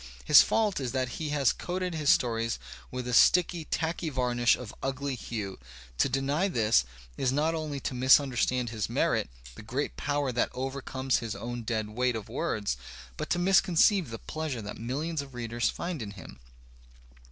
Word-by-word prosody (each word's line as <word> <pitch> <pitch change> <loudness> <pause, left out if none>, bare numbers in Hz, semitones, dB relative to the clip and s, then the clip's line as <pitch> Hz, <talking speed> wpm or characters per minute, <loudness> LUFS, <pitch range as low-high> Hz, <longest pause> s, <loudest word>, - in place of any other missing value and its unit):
His 150 - +9
fault 215 -6 +1
is 130 -2 -3
that 130 -2 -2
he 155 -2 -3
has 145 -3 +2
coated 180 0 -3
his 155 -3 0
stories 115 -2 +2 0.3
with 125 -1 -5
a 125 - -2
sticky, 175 +4 +4
tacky 165 +1 -2
varnish 125 -3 +2
of 125 -4 -8
ugly 135 +1 -2
hue. 105 -5 -5 0.4
To - - +3
deny 140 +7 +1
this 110 - +3 0.3
is 130 - +1
not 150 +4 +1
only 155 -3 -3
to - - -3
misunderstand 125 -2 +3
his 110 -4 -3
merit, - - +1 0.2
the - - -11
great 125 +7 -3
power 145 -2 -1
that 120 - +1
overcomes 130 0 -2
his 115 -3 -4
own 120 0 -5
dead 110 -2 -2
weight/ 125 +2 0
of 110 -3 -6
words, 100 - -2 0.4
but - - -5
to - - +1
misconceive 185 - +4
the 115 - -5
pleasure 150 -7 -4
that 105 - -7
millions 145 +7 -2
of 135 -2 -11
readers 120 -1 -1
find 170 -5 -4
in 105 - -5
him. 100 -8 -11
130 Hz, 175 wpm, -29 LUFS, 120-155 Hz, 0.4 s, His